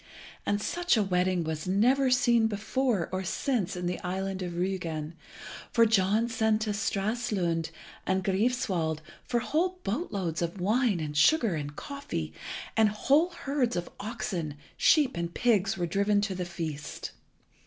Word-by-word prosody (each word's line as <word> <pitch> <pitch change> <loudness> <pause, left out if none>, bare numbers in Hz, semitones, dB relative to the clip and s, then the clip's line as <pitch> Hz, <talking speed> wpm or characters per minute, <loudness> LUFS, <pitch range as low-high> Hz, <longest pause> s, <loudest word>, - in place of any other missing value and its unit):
And 205 - +2
such 350 +6 +1
a 215 - +3
wedding 180 -2 +1
was 160 +1 -4
never 250 +8 +3
seen 240 -3 +4
before 220 -1 0
or 185 0 -2
since 210 +1 -1
in 180 0 -4
the 180 +1 -1
island 190 +1 -3
of 175 -1 -3
Rügen, 170 -3 -2 0.6
for 230 -1 +5
John 215 +1 +3
sent 220 -2 +1
to 215 -1 0
Stralsund 200 -5 -1 0.4
and 190 0 +1
Greifswald 190 -6 0 0.3
for 240 -1 +1
whole 360 +8 0
boat 230 - -2
loads 175 -6 -2
of 170 +3 -2
wine 215 +1 +2
and 150 -2 -4
sugar 230 - +4
and 145 -2 -4
coffee; 280 - -5 0.4
and 220 -1 +5
whole 280 - +3
herds 275 - -1
of 175 -1 -3
oxen, 200 -8 -3 0.2
sheep, 295 -6 +4
and 170 0 -3
pigs 210 -5 +2
were 175 - 0
driven 200 +4 +2
to 200 -1 -1
the 180 -1 -3
feast. 155 -4 -5
200 Hz, 155 wpm, -29 LUFS, 175-235 Hz, 0.6 s, for